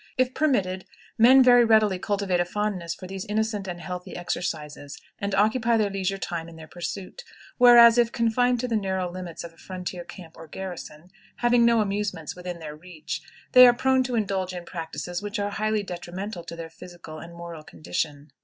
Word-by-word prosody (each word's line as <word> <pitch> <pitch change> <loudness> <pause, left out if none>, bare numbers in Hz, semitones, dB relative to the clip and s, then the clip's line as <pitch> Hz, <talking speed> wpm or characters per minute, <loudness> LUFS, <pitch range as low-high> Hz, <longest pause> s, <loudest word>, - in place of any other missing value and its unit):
If 255 0 +1
permitted, 195 -12 0 0.3
men 260 +4 +8
very 245 -1 +7
readily 215 -4 +3
cultivate 200 -2 -1
a - - +3
fondness 185 -3 -3
for - - -10
these 190 0 -6
innocent 210 -1 -2
and 175 -1 -5
healthy 180 +1 -7
exercises, 150 -5 -4 0.2
and 200 -1 -2
occupy 225 +3 +2
their 210 -2 +1
leisure 195 0 -2
time 170 -3 -5
in 165 - -13
their 160 -1 -11
pursuit; 185 - -6 0.4
whereas, 240 -1 +8
if 235 -1 +3
confined 245 +1 +1
to 250 - -2
the 235 - -1
narrow 190 -3 -1
limits 180 -2 -7
of 170 -1 -9
a - - -26
frontier 180 -1 -6
camp 175 -1 -12
or 165 - -11
garrison, 175 -2 -8 0.2
having 240 0 +3
no 235 -1 +4
amusements 200 -6 -3
within 180 -1 -6
their 155 -2 -8
reach, 165 0 -7 0.3
they 250 0 +10
are 245 - +6
prone 260 +1 +2
to 250 -1 -2
indulge 195 -4 -1
in 175 -1 -7
practices 175 +1 -5
which 205 +2 -4
are 205 0 -2
highly 215 0 -1
detrimental 180 +1 -6
to 170 - -7
their 165 -1 -8
physical 170 -3 -11
and 170 0 -11
moral 170 -2 -8
condition. 145 - -5
190 Hz, 190 wpm, -25 LUFS, 175-220 Hz, 0.4 s, they